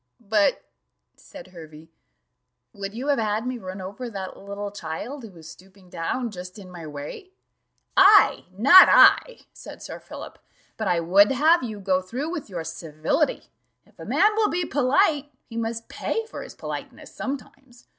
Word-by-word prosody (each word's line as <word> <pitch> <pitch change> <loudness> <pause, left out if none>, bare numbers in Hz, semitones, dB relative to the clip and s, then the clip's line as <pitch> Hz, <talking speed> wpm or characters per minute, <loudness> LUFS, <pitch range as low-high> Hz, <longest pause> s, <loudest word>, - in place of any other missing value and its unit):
"But," 210 -2 +1 0.5
said 275 -7 -13
Hervey, 160 -2 -13 0.8
"would 200 0 -7
you 260 +5 -4
have 280 - +2
had 215 +1 -1
me 250 -1 -4
run 185 -1 -8
over 200 +7 -7
that 195 -3 -7
little 200 +1 -7
child, 205 - -6
who 225 - -10
was 165 -4 -14
stooping 185 +2 -16
down 230 +9 -3
just 180 0 -9
in 190 -3 -12
my 170 -3 -9
way?" 150 - -9 0.6
"I!' 395 +2 +6
not 280 - +9
I," - - +5
said - - -11
Sir - - -8
Philip; - - -11 0.4
"but 220 - -3
I 175 -2 +2
would 195 +6 +5
have 315 +6 +4
you 220 -4 -6
go 190 -1 0
through 255 - -5
with 320 -10 -6
your 175 -4 -5
civility: 165 - -2 0.3
if - - -28
a - - -9
man 420 - +3
will 430 -1 +1
be 350 +1 -1
polite, 290 +2 +1
he 230 - -12
must 230 0 -4
pay 450 - -3
for 450 - -9
his - - -10
politeness - - -8
sometimes. 270 -2 -8
215 Hz, 165 wpm, -24 LUFS, 185-275 Hz, 0.8 s, not